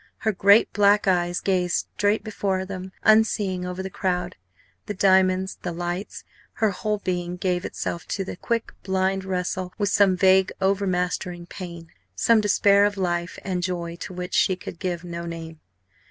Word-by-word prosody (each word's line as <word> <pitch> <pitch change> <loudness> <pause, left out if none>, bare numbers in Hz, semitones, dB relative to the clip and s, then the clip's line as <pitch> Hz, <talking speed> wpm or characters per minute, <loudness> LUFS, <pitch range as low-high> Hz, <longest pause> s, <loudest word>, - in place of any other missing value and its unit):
Her 220 - 0
great 200 +3 +4
black 205 0 +4
eyes 175 -1 +2
gazed 180 -2 0
straight 205 +1 +1
before 195 -3 -2
them, 190 -1 -7
unseeing, 205 -4 +3
over 180 +1 -4
the 190 - -4
crowd, 180 -2 -2 0.5
the 210 - -4
diamonds, 190 0 +3
the 175 - -3
lights; 175 +3 -4 0.3
her 220 -3 +1
whole 210 +3 -2
being 180 -2 -3
gave 180 -1 -1
itself 170 - -4
to 195 - -2
a - - -5
quick, 230 +4 -2
blind 190 0 0
wrestle 185 -1 -3
with 205 -2 0
some 195 -2 +4
vague 190 0 +4
overmastering 180 -2 -1
pain, 170 -3 -9 0.2
some 225 - +4
despair 200 -1 +4
of 205 -1 -1
life 175 -1 -2
and 185 -2 -2
joy 170 -2 -3
to - - -7
which 180 0 -6
she 185 - +3
could 180 - -9
give 180 -2 -3
no 170 -1 -6
name. 165 -1 -7
185 Hz, 165 wpm, -24 LUFS, 180-200 Hz, 0.5 s, great